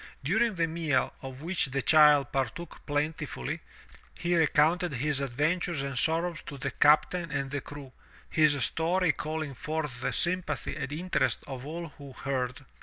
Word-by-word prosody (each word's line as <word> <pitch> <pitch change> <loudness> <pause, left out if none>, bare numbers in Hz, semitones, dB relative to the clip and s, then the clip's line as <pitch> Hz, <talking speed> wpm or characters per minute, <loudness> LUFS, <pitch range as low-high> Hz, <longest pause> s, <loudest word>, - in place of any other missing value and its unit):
During 215 - +2
the 170 -1 +2
meal, 160 -3 0
of 135 +1 -8
which 175 -3 +1
the 135 0 -2
child 150 -3 +6
partook 135 +6 -3
plentifully, 150 - -2 0.6
he 175 0 0
recounted 160 +1 +3
his 145 +2 0
adventures 150 +4 0
and 140 -1 -4
sorrows 165 +5 0
to 145 -4 -6
the 135 +1 -3
captain 155 +4 +3
and 140 -2 -2
the 145 0 -2
crew, 145 -2 -10 0.4
his 145 -4 +3
story 175 +1 +2
calling 155 -1 -4
forth 150 -2 -3
the - - 0
sympathy 175 -4 -1
and 140 - -4
interest 175 +5 0
of 135 -1 -7
all 165 +1 -5
who 140 -2 -10
heard. 135 0 -3
150 Hz, 155 wpm, -29 LUFS, 140-165 Hz, 0.6 s, child